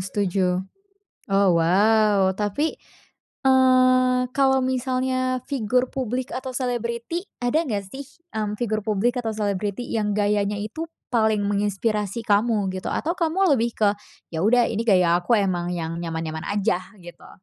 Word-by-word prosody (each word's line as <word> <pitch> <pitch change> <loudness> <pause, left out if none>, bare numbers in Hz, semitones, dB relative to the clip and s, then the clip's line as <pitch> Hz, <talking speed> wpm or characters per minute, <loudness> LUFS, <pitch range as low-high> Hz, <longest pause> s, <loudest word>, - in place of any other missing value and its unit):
setuju, 185 -1 -1 0.7
oh, 195 0 +3
wow. 195 +3 +3
Tapi, 210 +10 -1 0.7
eee, 255 -1 +4
kalau 265 -1 +3
misalnya 255 0 0
figur 250 -1 0
publik 255 -1 -3
atau 260 +1 -4
selebriti, 240 +5 -3 0.2
ada 245 +7 +1
nggak 205 -6 -2
sih, 275 +1 -7 0.3
m 210 -1 -2
figur 215 -3 -1
publik 220 +3 +1
atau 225 - -2
selebriti 205 +2 -2
yang 210 -2 0
gayanya 205 0 +1
itu 215 +9 -5 0.3
paling 220 -3 +2
menginspirasi 205 +2 -1
kamu 210 -1 +2
gitu? 185 - -4
Atau, 335 +3 -1
kamu 340 0 +2
lebih 235 -2 0
ke, 210 - +4 0.5
"Ya 160 - -1
udah, 240 +3 +4
ini 225 0 -1
gaya 180 -5 +4
aku 225 +6 +2
emang 180 -3 -1
yang 165 -1 -4
nyaman-nyaman 160 -1 -4
aja," 200 -2 +1 0.2
gitu. 175 -1 -13
215 Hz, 140 wpm, -23 LUFS, 200-255 Hz, 0.7 s, eee